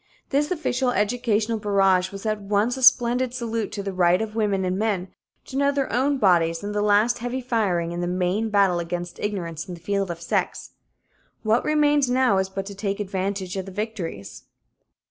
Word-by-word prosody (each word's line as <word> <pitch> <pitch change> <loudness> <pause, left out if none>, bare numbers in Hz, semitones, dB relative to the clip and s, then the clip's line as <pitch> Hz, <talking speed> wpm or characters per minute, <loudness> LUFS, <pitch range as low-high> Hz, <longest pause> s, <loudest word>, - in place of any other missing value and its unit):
This 290 +2 +1
official 265 -7 0
educational 225 0 0
barrage 195 -3 +2
was 195 +2 -8
at 215 -1 -1
once 205 +4 +1
a 265 - -6
splendid 250 0 +4
salute 230 -3 -3
to 200 - -4
the 195 -1 -4
right 180 0 +3
of 220 -1 -4
women 205 -4 0
and 180 0 0
men 200 -4 -1 0.4
to 265 - -10
know 280 +1 +3
their 280 -4 -2
own 275 +4 +2
bodies 170 -6 +2
and 205 0 -4
the 210 - 0
last 210 +4 +3
heavy 245 +2 -3
firing 205 -9 0
in 175 0 -4
the 175 - -1
main 185 +5 0
battle 195 -4 +3
against 175 +1 -5
ignorance 170 -6 -4
in 180 - -6
the - - -13
field 195 +2 -1
of 170 -1 -5
sex. 170 - -2 0.7
What 220 +2 +2
remains 295 -3 +3
now 250 -6 +3
is 190 0 -1
but 195 0 -4
to 200 - -7
take 200 0 -3
advantage 190 -1 -3
of 190 0 -4
the - - -7
victories. 180 - -6
205 Hz, 195 wpm, -24 LUFS, 185-235 Hz, 0.7 s, splendid